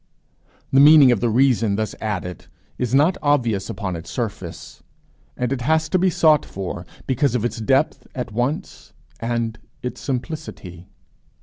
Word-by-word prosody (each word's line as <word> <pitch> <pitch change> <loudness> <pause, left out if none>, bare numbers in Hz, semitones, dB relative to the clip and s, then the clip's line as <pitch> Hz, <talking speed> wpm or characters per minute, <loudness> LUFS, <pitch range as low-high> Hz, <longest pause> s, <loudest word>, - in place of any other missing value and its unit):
The 135 - +6
meaning 145 -2 +8
of 120 - +2
the 120 - +1
reason 115 -3 +3
thus 110 0 -2
added 90 -5 -4 0.3
is 125 0 0
not 155 +7 +3
obvious 120 -9 +1
upon 95 -3 -4
its 85 0 -8
surface. 90 -6 -6 0.6
It 125 +1 -1
has 160 +4 +1
to 185 - +2
be 185 +1 +3
sought 155 -3 +4
for 90 -2 -6 0.2
because 135 0 +1
of 120 -2 0
its 120 0 -2
depth 135 +6 +1
at 125 -3 -4
once 125 +7 -3 0.3
and 115 -1 -2 0.2
its 125 - -5
simplicity. 125 - -6
120 Hz, 145 wpm, -21 LUFS, 105-140 Hz, 0.6 s, meaning